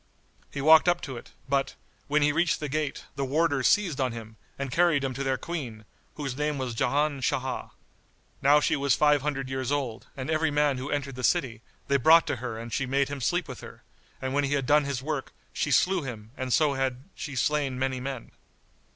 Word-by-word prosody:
He 140 Hz, -, -4 dB
walked 160 Hz, +3 st, +7 dB
up 175 Hz, 0 st, +2 dB
to 135 Hz, -5 st, -6 dB
it; 120 Hz, -, -10 dB, 0.2 s
but, 135 Hz, 0 st, 0 dB, 0.3 s
when 150 Hz, +1 st, +2 dB
he 145 Hz, -, +4 dB
reached 170 Hz, +2 st, +1 dB
the 150 Hz, -, -3 dB
gate, 150 Hz, 0 st, -3 dB
the 140 Hz, -, -2 dB
warders 145 Hz, 0 st, +2 dB
seized 180 Hz, -10 st, +2 dB
on 130 Hz, -3 st, 0 dB
him, 110 Hz, -1 st, -9 dB, 0.2 s
and 140 Hz, -2 st, -4 dB
carried 165 Hz, -2 st, +3 dB
him 135 Hz, -1 st, -1 dB
to 135 Hz, +2 st, -3 dB
their 135 Hz, -1 st, 0 dB
Queen, 125 Hz, -12 st, -6 dB, 0.3 s
whose 135 Hz, -4 st, -4 dB
name 150 Hz, +1 st, -1 dB
was 130 Hz, -3 st, -3 dB
Ján 145 Hz, +4 st, +1 dB
Sháh.[FN#72] 130 Hz, 0 st, -2 dB, 0.7 s
Now 145 Hz, +2 st, +6 dB
she -, -, +1 dB
was 140 Hz, -2 st, +2 dB
five 150 Hz, -1 st, +4 dB
hundred 135 Hz, -2 st, -2 dB
years 130 Hz, 0 st, -3 dB
old, 130 Hz, -5 st, -2 dB
and 130 Hz, +3 st, -3 dB
every 160 Hz, 0 st, +2 dB
man 145 Hz, -2 st, +1 dB
who 130 Hz, +3 st, -5 dB
entered 140 Hz, -2 st, -2 dB
the 125 Hz, 0 st, -7 dB
city, 115 Hz, -4 st, +1 dB, 0.3 s
they 140 Hz, -, +3 dB
brought 160 Hz, +5 st, +6 dB
to 130 Hz, -, -2 dB
her 120 Hz, -2 st, -5 dB
and 115 Hz, 0 st, -7 dB
she 135 Hz, -, -1 dB
made 135 Hz, +1 st, +1 dB
him 140 Hz, -1 st, -5 dB
sleep 175 Hz, +7 st, 0 dB
with -, -, -8 dB
her, -, -, -12 dB, 0.4 s
and 130 Hz, 0 st, -3 dB
when 145 Hz, +1 st, +2 dB
he 140 Hz, 0 st, 0 dB
had 140 Hz, -2 st, 0 dB
done 145 Hz, +2 st, +4 dB
his 135 Hz, -2 st, -3 dB
work, 150 Hz, -2 st, -3 dB, 0.2 s
she -, -, -1 dB
slew 180 Hz, +7 st, +3 dB
him 115 Hz, -6 st, -7 dB
and 130 Hz, -1 st, -4 dB
so 150 Hz, +2 st, +3 dB
had 135 Hz, -1 st, -2 dB
she 145 Hz, -3 st, -6 dB
slain 140 Hz, 0 st, 0 dB
many 130 Hz, 0 st, -1 dB
men. 130 Hz, -2 st, -6 dB
140 Hz, 220 wpm, -27 LUFS, 130-150 Hz, 0.7 s, walked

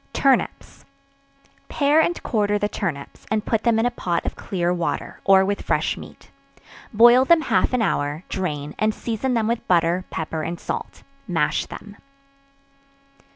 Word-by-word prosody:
Turnips. 270 Hz, -2 st, 0 dB, 0.9 s
Pare 295 Hz, +2 st, +3 dB
and 345 Hz, +2 st, -1 dB
quarter 210 Hz, -2 st, +1 dB
the 205 Hz, -, 0 dB
turnips, 165 Hz, -9 st, -5 dB
and 215 Hz, 0 st, -1 dB
put 225 Hz, -2 st, 0 dB
them 230 Hz, -1 st, +2 dB
in 225 Hz, -, +2 dB
a 245 Hz, -, +1 dB
pot 175 Hz, -7 st, -2 dB
of -, -, -3 dB
clear 175 Hz, -2 st, -2 dB
water, 175 Hz, -1 st, -3 dB
or 190 Hz, -1 st, +6 dB
with 200 Hz, +1 st, -2 dB
fresh -, -, 0 dB
meat; -, -, -13 dB, 0.6 s
boil 240 Hz, +3 st, +6 dB
them 335 Hz, +4 st, +4 dB
half -, -, +1 dB
an 250 Hz, -3 st, +1 dB
hour; 145 Hz, -4 st, -1 dB
drain, 150 Hz, -6 st, -4 dB
and 215 Hz, 0 st, +1 dB
season 240 Hz, +2 st, -2 dB
them 225 Hz, -2 st, +1 dB
with 235 Hz, 0 st, -2 dB
butter, 175 Hz, +1 st, +2 dB
pepper 160 Hz, 0 st, -4 dB
and 170 Hz, +2 st, -4 dB
salt; -, -, -6 dB, 0.2 s
mash 165 Hz, -5 st, 0 dB
them. 205 Hz, -1 st, -11 dB
205 Hz, 155 wpm, -22 LUFS, 175-235 Hz, 0.9 s, or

